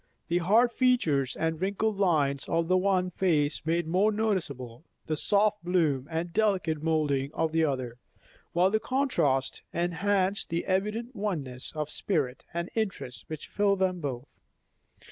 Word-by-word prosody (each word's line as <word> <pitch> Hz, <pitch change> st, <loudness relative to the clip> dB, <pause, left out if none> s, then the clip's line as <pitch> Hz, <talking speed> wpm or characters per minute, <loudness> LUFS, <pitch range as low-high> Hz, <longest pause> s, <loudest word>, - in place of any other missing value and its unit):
The 175 Hz, +1 st, +2 dB
hard 220 Hz, +8 st, +4 dB
features 170 Hz, -, +2 dB
and 160 Hz, 0 st, -2 dB
wrinkled 200 Hz, +2 st, 0 dB
lines 145 Hz, -8 st, +1 dB
of 165 Hz, 0 st, +1 dB
the 185 Hz, -, +3 dB
one 185 Hz, -1 st, +2 dB
face 155 Hz, -5 st, +1 dB
made 170 Hz, +1 st, +1 dB
more 185 Hz, +6 st, +2 dB
noticeable 160 Hz, -, -2 dB, 0.2 s
the 155 Hz, -, -1 dB
soft 210 Hz, +5 st, +2 dB
bloom 160 Hz, -7 st, +1 dB
and 165 Hz, +1 st, -3 dB
delicate 190 Hz, -8 st, +1 dB
moulding 150 Hz, -4 st, +1 dB
of 160 Hz, -1 st, 0 dB
the 160 Hz, 0 st, +2 dB
other, 130 Hz, -4 st, -3 dB, 0.5 s
while 180 Hz, +3 st, +3 dB
the 220 Hz, -, +2 dB
contrast 220 Hz, -, 0 dB
enhanced 185 Hz, +3 st, 0 dB
the 170 Hz, +1 st, -2 dB
evident 210 Hz, +6 st, -1 dB
oneness 150 Hz, -, -3 dB
of 150 Hz, -1 st, -3 dB
spirit 145 Hz, -10 st, -1 dB
and 170 Hz, +1 st, -4 dB
interest 160 Hz, -, -3 dB
which 155 Hz, -1 st, -6 dB
filled 200 Hz, -1 st, +1 dB
them 185 Hz, -1 st, 0 dB
both. 135 Hz, -4 st, -6 dB
170 Hz, 145 wpm, -28 LUFS, 150-200 Hz, 0.5 s, hard